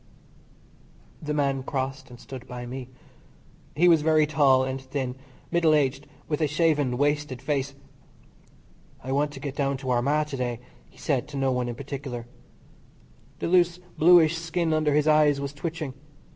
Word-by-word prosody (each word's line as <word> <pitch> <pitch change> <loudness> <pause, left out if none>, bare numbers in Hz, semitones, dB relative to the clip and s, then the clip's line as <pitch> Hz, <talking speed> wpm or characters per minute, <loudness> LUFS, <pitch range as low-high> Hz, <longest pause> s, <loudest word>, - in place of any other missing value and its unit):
The 150 -1 -3
man 140 -2 +1
crossed 135 0 -4
and 120 -1 -12
stood 130 -1 -10
by 125 0 -7
me. 125 +1 -7 0.9
He 175 +4 +4
was 165 -3 +6
very 155 0 +4
tall 140 -3 +4
and 130 0 -3
thin, 130 -1 -4 0.4
middle 170 -3 +4
aged, 140 -1 0 0.2
with 150 0 -2
a 155 - +3
shaven, 150 -4 +1
wasted 145 -2 0
face. 140 0 -2 1.3
"I 130 - -4
want 145 +2 +1
to 135 - -8
get 140 0 -5
down 140 -1 0
to 130 -1 -3
Armagh 140 +5 +2
to 135 - -4
day," 120 -2 -2 0.3
he - - -23
said 140 -1 -1
to 145 -2 -7
no 135 -1 +1
one 125 -1 -1
in 120 - -5
particular. 135 -3 -6 1.1
The - - -3
loose 175 0 +3 0.2
bluish 165 -1 +5
skin 165 0 -1
under 155 -2 +2
his 150 0 +2
eyes 150 -2 +4
was 140 0 -4
twitching. 155 -2 -5
140 Hz, 165 wpm, -26 LUFS, 130-155 Hz, 1.3 s, was